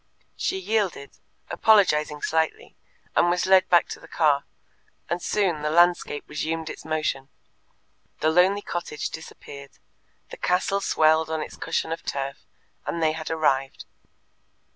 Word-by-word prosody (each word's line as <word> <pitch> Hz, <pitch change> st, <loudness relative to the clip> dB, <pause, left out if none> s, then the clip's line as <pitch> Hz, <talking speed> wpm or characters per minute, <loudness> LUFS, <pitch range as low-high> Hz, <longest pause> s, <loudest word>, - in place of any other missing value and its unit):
She 380 Hz, -, -1 dB
yielded, 210 Hz, -, -1 dB, 0.4 s
apologizing 150 Hz, -9 st, +3 dB
slightly, 160 Hz, 0 st, -1 dB, 0.4 s
and 175 Hz, -, +4 dB
was 180 Hz, +1 st, +1 dB
led 190 Hz, 0 st, +5 dB
back 175 Hz, -, +5 dB
to -, -, -6 dB
the -, -, -14 dB
car, 145 Hz, -4 st, +2 dB, 0.6 s
and 175 Hz, +1 st, -2 dB
soon 185 Hz, -7 st, 0 dB
the 150 Hz, -, -1 dB
landscape 175 Hz, -2 st, +3 dB
resumed 160 Hz, +1 st, -3 dB
its -, -, -11 dB
motion, 155 Hz, -4 st, -2 dB, 0.9 s
the 155 Hz, -, +2 dB
lonely 190 Hz, +4 st, +3 dB
cottage 150 Hz, -4 st, -4 dB
disappeared, 140 Hz, -3 st, -10 dB, 0.5 s
the -, -, -8 dB
castle 195 Hz, +2 st, 0 dB
swelled 160 Hz, -2 st, +3 dB
on 160 Hz, 0 st, -2 dB
its -, -, -10 dB
cushion 160 Hz, -, -2 dB
of 165 Hz, -, -3 dB
turf, 140 Hz, 0 st, -5 dB, 0.4 s
and -, -, -2 dB
they 155 Hz, -, +3 dB
had 160 Hz, 0 st, -6 dB
arrived. 135 Hz, -4 st, 0 dB
160 Hz, 140 wpm, -25 LUFS, 150-180 Hz, 0.9 s, led